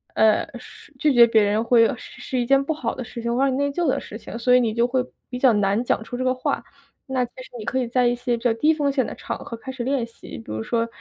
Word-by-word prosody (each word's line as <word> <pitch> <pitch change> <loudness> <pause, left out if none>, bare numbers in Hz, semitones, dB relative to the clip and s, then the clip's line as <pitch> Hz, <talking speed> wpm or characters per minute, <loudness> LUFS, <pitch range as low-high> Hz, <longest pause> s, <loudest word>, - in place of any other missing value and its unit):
呃， 220 -1 +4
是 - - -15
拒 300 - +3
绝 240 -1 +8
别 225 -2 +4
人 210 +2 +1
会 230 -1 +5
是 - - -12
是 255 - -2
一 240 - 0
件 275 +2 +4
不 285 - -2
好 250 -7 -3
的 255 - -5
事 235 - -9
情， 235 +1 -1
会 260 - +2
让 275 - +3
你 260 - -1
内 285 0 0
疚 340 +3 -1
的 260 - +1
事 - - -10
情， 230 - -8
所 250 +1 +4
以 - - +6
你 235 -3 +1
就 235 +1 +2
会 255 +1 0 0.3
比 250 - -5
较 260 -1 +5
难 205 +2 +1
讲 230 - 0
出 245 - -7
这 255 - -2
个 255 - +2
话。 255 - -2 0.4
那 260 -2 0
其 240 - -17
实 - - -14
你 215 - -7
可 260 +2 -1
以 250 - -1
在 250 +1 +2
一 240 - +2
些 240 0 -1
比 230 - -12
较 240 -2 +3
低 300 +8 +3
风 290 -2 +1
险 265 -3 +1
的 - - -6
场 - - -5
合 230 - -7
开 265 - -7
始 260 -2 -5
练 260 -1 0
习， 230 - -11
比 110 - -10
如 110 0 -3
说 230 - -1
245 Hz, 335 characters per minute, -23 LUFS, 230-260 Hz, 0.4 s, 绝